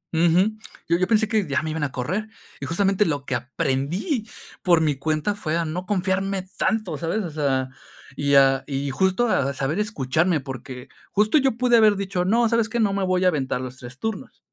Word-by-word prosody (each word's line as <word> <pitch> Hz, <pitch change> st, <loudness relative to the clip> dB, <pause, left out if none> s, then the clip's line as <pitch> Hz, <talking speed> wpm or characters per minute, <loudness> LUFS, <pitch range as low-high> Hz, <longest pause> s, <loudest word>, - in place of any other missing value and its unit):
Ujú, 180 Hz, +6 st, +3 dB, 0.3 s
yo 170 Hz, +1 st, +3 dB
yo 185 Hz, -, +1 dB
pensé 220 Hz, +1 st, +3 dB
que 215 Hz, -3 st, 0 dB
ya 140 Hz, 0 st, 0 dB
me 155 Hz, -, -3 dB
iban 160 Hz, -1 st, -3 dB
a 140 Hz, -, -1 dB
correr. 185 Hz, -, -3 dB, 0.3 s
Y -, -, -4 dB
justamente 195 Hz, +4 st, +2 dB
lo 145 Hz, -5 st, -2 dB
que 135 Hz, -, -3 dB
aprendí 140 Hz, -, -2 dB, 0.3 s
por 175 Hz, -3 st, +4 dB
mi 155 Hz, -3 st, +1 dB
cuenta 155 Hz, +7 st, -1 dB
fue 165 Hz, -5 st, -2 dB
a 170 Hz, -, 0 dB
no 180 Hz, +4 st, -4 dB
confiarme 195 Hz, -1 st, 0 dB
tanto, 215 Hz, -9 st, -1 dB
¿sabes? 185 Hz, +6 st, -1 dB
O 170 Hz, -, -5 dB
sea, 135 Hz, -4 st, 0 dB, 0.5 s
y 140 Hz, 0 st, +1 dB
a 135 Hz, -1 st, +5 dB
y 140 Hz, -1 st, -2 dB
justo 190 Hz, -, +1 dB
a 140 Hz, -, +1 dB
saber 140 Hz, +8 st, -1 dB
escucharme, 170 Hz, -4 st, 0 dB
porque 130 Hz, -2 st, -8 dB, 0.2 s
justo 215 Hz, +8 st, +3 dB
yo 265 Hz, -4 st, +1 dB
pude 245 Hz, -1 st, +4 dB
haber 215 Hz, -2 st, +5 dB
dicho: 195 Hz, -2 st, -2 dB
"No, 230 Hz, +4 st, +3 dB
¿sabes 230 Hz, -1 st, +1 dB
qué? 235 Hz, +1 st, -2 dB
No 205 Hz, -3 st, +2 dB
me 195 Hz, 0 st, -1 dB
voy 185 Hz, 0 st, +1 dB
a -, -, +6 dB
aventar 135 Hz, -6 st, -1 dB
los 130 Hz, 0 st, -7 dB
3 125 Hz, 0 st, -11 dB
turnos". 220 Hz, +4 st, -5 dB
175 Hz, 205 wpm, -23 LUFS, 140-210 Hz, 0.5 s, a